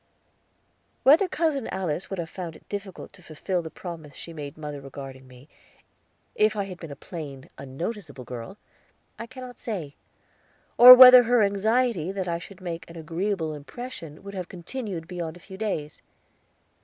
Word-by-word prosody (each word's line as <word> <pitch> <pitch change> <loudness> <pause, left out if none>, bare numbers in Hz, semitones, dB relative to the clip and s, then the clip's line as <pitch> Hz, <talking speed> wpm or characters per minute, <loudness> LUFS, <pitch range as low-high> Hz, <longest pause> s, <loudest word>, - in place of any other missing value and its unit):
Whether 315 +8 +6
Cousin 315 -7 -1
Alice 180 -2 -3
would 195 - -4
have 170 -2 -3
found 170 -1 -7
it - - -18
difficult 200 -2 -7
to 190 - -17
fulfill 175 +3 -3
the 160 - -7
promise 160 -4 -9
she 170 - -9
made 145 -2 -8
mother 150 -2 -6
regarding 135 -1 -10
me, 125 +2 -16 0.9
if 215 0 +2
I 205 - -1
had 185 -3 -8
been 165 - -8
a 140 - -7
plain, 140 -3 -9
unnoticeable 140 - -6
girl, 120 - -8 0.6
I 230 - -6
cannot 255 -1 -10
say, 175 -11 -5 0.8
or 250 +1 +12
whether 250 0 +11
her 240 -1 +4
anxiety 205 -2 +1
that 190 -2 -3
I 170 -1 -1
should 190 +2 -13
make 170 -2 -6
an 165 - -11
agreeable 165 +1 -2
impression 155 - -9
would 200 0 -8
have 185 -3 -5
continued 185 -2 -6
beyond 175 -2 -5
a - - -16
few 190 +2 -12
days. 190 -8 -4
175 Hz, 165 wpm, -26 LUFS, 155-210 Hz, 0.9 s, or